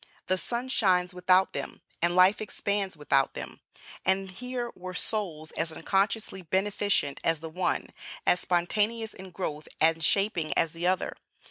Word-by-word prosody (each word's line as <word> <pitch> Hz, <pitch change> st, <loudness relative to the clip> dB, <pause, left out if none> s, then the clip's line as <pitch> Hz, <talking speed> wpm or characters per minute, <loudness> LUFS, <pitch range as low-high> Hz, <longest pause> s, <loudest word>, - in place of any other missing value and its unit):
The 185 Hz, -, +1 dB
sun 240 Hz, +5 st, -3 dB
shines 185 Hz, -6 st, +2 dB
without 185 Hz, +1 st, +3 dB
them, -, -, -5 dB, 0.2 s
and 175 Hz, +1 st, +2 dB
life 185 Hz, +3 st, +5 dB
expands 200 Hz, -4 st, -2 dB
without 140 Hz, -2 st, +2 dB
them; -, -, -7 dB, 0.4 s
and 190 Hz, 0 st, +1 dB
here 245 Hz, +3 st, -4 dB
were 185 Hz, 0 st, -7 dB
souls 170 Hz, -9 st, -2 dB
as 165 Hz, 0 st, -2 dB
unconsciously 195 Hz, +3 st, 0 dB
beneficent 190 Hz, -4 st, +1 dB
as 165 Hz, -1 st, +2 dB
the 160 Hz, +1 st, -7 dB
one, 180 Hz, +2 st, -1 dB, 0.4 s
as 180 Hz, -, +4 dB
spontaneous 210 Hz, +6 st, +1 dB
in 190 Hz, 0 st, -10 dB
growth 155 Hz, -4 st, -4 dB
and 165 Hz, 0 st, +3 dB
shaping 185 Hz, -4 st, +2 dB
as 165 Hz, -, +3 dB
the 170 Hz, +2 st, -2 dB
other. 185 Hz, 0 st, 0 dB
185 Hz, 150 wpm, -28 LUFS, 165-205 Hz, 0.4 s, life